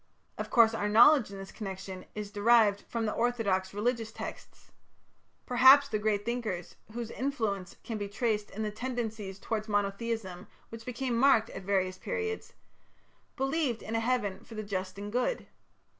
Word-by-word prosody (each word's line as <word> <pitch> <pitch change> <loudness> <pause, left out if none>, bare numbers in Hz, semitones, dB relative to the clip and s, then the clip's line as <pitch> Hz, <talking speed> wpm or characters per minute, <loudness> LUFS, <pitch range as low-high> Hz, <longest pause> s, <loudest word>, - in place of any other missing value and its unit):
Of - - -5
course, 230 -2 +5
our 210 -2 -1
knowledge 240 +3 +6
in 200 - -8
this 195 0 -8
connection 190 -3 -7
is 210 -1 -5
derived 210 -1 +4
from 230 -1 -1
the 215 - 0
orthodox 210 -6 0
religious 225 +2 -1
texts. - - -9 0.7
Perhaps 265 +3 +7
the 215 - -1
great 210 -1 0
thinkers, 220 -8 -3 0.2
whose 235 -1 -5
influence 220 -9 -2
can 225 -2 -4
be 205 - -3
traced 210 -1 -1
in 220 - -5
the 210 - -2
tendencies 220 -4 -4
towards 215 +2 -3
monotheism 205 -2 -2 0.2
which 225 0 -9
became 250 0 -2
marked 235 -2 +4
at - - -7
various 185 -1 0
periods, 445 -2 -4 0.8
believed 270 -3 -1
in 220 - -5
a 225 - +2
Heaven 225 -5 -1
for 225 - -12
the 215 - -4
just 190 -2 -4
and 205 +1 -6
good. 250 - 0
220 Hz, 160 wpm, -30 LUFS, 200-240 Hz, 0.8 s, Perhaps